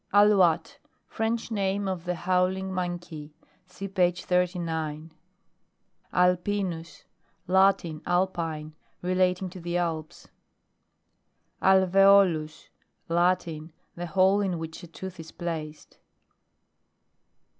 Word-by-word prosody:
ALOU.VTTE 205 - +4 0.3
French 225 +1 -2
name 200 -1 -1
of 185 -2 -4
the 180 0 -1
howl 180 +2 +1
ing 190 0 -5
monkey. 175 -4 -5 0.3
(See 195 +2 -7
page 180 -2 0
39.) 165 -4 -1 1.0
ALPINUS. 180 -2 0 0.4
Latin, 190 -4 +2
Alpine; 165 -4 -1 0.3
relating 185 +1 +1
to 185 - -9
the 175 +1 -2
Alps. 160 -3 -4 1.3
ALVEOLUS. 190 -4 +4 0.4
Latin. 170 -2 0 0.2
The 175 0 -6
hole 190 +3 +3
in 190 -3 -1
which 160 0 -7
a 175 - -10
tooth 185 +2 -9
is 160 0 -9
placed. 160 -3 -6
180 Hz, 95 wpm, -27 LUFS, 165-190 Hz, 1.3 s, ALOU.VTTE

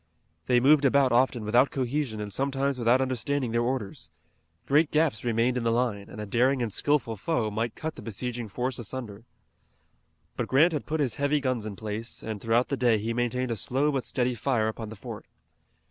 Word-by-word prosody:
They 125 -1 +4
moved 145 +3 +5
about 140 -1 +4
often 120 -2 +2
without 120 +5 +4
cohesion 130 -3 -2
and 105 -1 -4
sometimes 135 0 -1
without 120 +2 +3
understanding 130 0 -1
their 115 +1 +1
orders. 120 -4 -3 0.6
Great 150 +2 +3
gaps 150 -7 +1
remained 120 +1 +1
in 125 - -1
the 115 - +2
line, 115 -4 -1
and 105 - -9
a 105 - -4
daring 125 +6 +2
and 115 -5 -1
skilful 145 -6 +1
foe 110 -1 -1
might 115 +2 -2
cut 160 0 -4
the - - -9
besieging 120 +1 -4
force 125 +4 -3
asunder. 115 -2 -6 1.1
But - - -2
Grant 155 +6 +4
had 150 - -3
put 155 0 -1
his 130 -6 -1
heavy 145 +1 +2
guns 130 -5 -1
in 105 - -6
place, 110 +2 -5
and 110 -2 -5
throughout 115 +2 +2
the 140 - -1
day 120 -3 +3
he 110 +2 -2
maintained 120 +1 -1
a - - 0
slow 135 +8 0
but 135 -3 -1
steady 125 -1 0
fire 120 -1 0
upon 110 0 -5
the 110 - -8
fort. 100 - -9
125 Hz, 200 wpm, -27 LUFS, 115-135 Hz, 1.1 s, moved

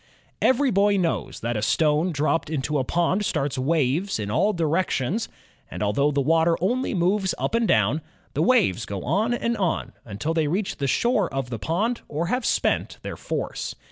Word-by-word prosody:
Every 260 +1 +3
boy 200 +1 +3
knows 175 -3 -2
that 120 +1 -2
a 105 - -1
stone 155 - +2
dropped 155 +1 0
into 150 -1 -1
a - - +1
pond 175 +7 +1
starts 145 -7 -1
waves 155 +6 +1
in 105 -2 -4
all 200 - +2
directions, 170 - 0 0.4
and - - -4
although 110 +8 +2
the 145 -1 0
water 165 +3 +3
only 245 +6 0
moves 190 +2 +1
up - - -2
and 230 -1 +2
down, 110 +9 +2 0.3
the 145 - 0
waves 160 - +2
go 100 -2 -5
on 205 - +1
and 235 -1 0
on, 185 -5 -1
until 115 +9 -3
they 160 -2 +1
reach 190 +6 -2
the 140 - -1
shore 225 - +1
of 135 -2 -3
the 115 - -4
pond 205 - -1
or 155 +3 -2
have 250 -1 0
spent - - 0
their - - -5
force. - - -4
165 Hz, 185 wpm, -24 LUFS, 135-200 Hz, 0.4 s, Every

